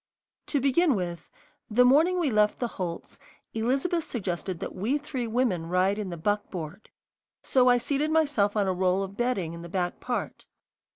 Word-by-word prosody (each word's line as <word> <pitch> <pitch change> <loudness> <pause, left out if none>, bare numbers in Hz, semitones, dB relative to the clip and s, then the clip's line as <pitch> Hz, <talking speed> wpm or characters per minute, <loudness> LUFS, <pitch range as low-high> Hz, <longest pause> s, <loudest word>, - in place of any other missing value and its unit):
To 285 - +1
begin 280 +2 +3
with, 175 -3 -4 0.4
the 245 +3 +5
morning 320 +8 +4
we 310 -6 +1
left 210 -1 +3
the 245 - -1
Holts, 175 -6 -6 0.3
Elizabeth 270 +10 0
suggested 185 - -4
that - - -5
we 225 +10 0
three 265 -5 -4
women 220 -8 0
ride 185 +3 +2
in 205 -3 -3
the 170 - -5
buckboard, 195 -1 -3 0.5
so 255 -1 +4
I 245 - +5
seated 280 +5 -1
myself 290 -11 +2
on 200 -2 +2
a 190 - +1
roll 185 +1 +1
of 195 0 -7
bedding 200 -8 -1
in 170 - -8
the 170 - -9
back 180 0 -2
part. 245 - -4
215 Hz, 175 wpm, -27 LUFS, 185-260 Hz, 0.5 s, the